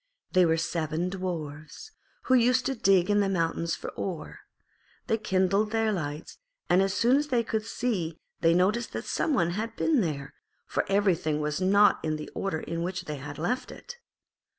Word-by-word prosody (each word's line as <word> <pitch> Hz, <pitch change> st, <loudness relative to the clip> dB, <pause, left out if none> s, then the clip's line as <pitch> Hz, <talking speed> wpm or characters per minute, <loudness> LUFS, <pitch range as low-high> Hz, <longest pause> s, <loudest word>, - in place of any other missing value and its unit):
They 185 Hz, -2 st, +5 dB
were 160 Hz, 0 st, +2 dB
seven 165 Hz, +1 st, -2 dB
Dwarfs, 170 Hz, -, -6 dB, 0.3 s
who 260 Hz, -, +1 dB
used 250 Hz, +1 st, +4 dB
to 270 Hz, -, 0 dB
dig 195 Hz, -5 st, +3 dB
in 205 Hz, -, +3 dB
the 200 Hz, -1 st, +2 dB
mountains 165 Hz, -2 st, 0 dB
for -, -, -7 dB
ore. 180 Hz, -5 st, -5 dB, 0.7 s
They 225 Hz, -, 0 dB
kindled 195 Hz, +1 st, +1 dB
their 225 Hz, 0 st, +1 dB
lights, 150 Hz, -5 st, -5 dB, 0.3 s
and 180 Hz, -, +5 dB
as 195 Hz, 0 st, +1 dB
soon 240 Hz, +6 st, +4 dB
as 295 Hz, +1 st, 0 dB
they 245 Hz, -5 st, +1 dB
could 220 Hz, -1 st, -2 dB
see 180 Hz, -11 st, -2 dB, 0.2 s
they 165 Hz, 0 st, +4 dB
noticed 205 Hz, +7 st, +1 dB
that -, -, -4 dB
some 305 Hz, -, 0 dB
one 170 Hz, -6 st, +2 dB
had 220 Hz, +5 st, -4 dB
been 305 Hz, -7 st, +2 dB
there, 145 Hz, -5 st, -3 dB, 0.3 s
for -, -, -1 dB
everything 180 Hz, -6 st, +2 dB
was 150 Hz, +3 st, -2 dB
not 200 Hz, +3 st, +5 dB
in 155 Hz, -1 st, 0 dB
the 155 Hz, 0 st, -7 dB
order 190 Hz, -5 st, -2 dB
in 165 Hz, 0 st, -4 dB
which 185 Hz, +1 st, -3 dB
they 150 Hz, -2 st, -4 dB
had 145 Hz, +1 st, -8 dB
left 245 Hz, +11 st, -2 dB
it. 485 Hz, -, -10 dB
185 Hz, 185 wpm, -28 LUFS, 165-215 Hz, 0.7 s, They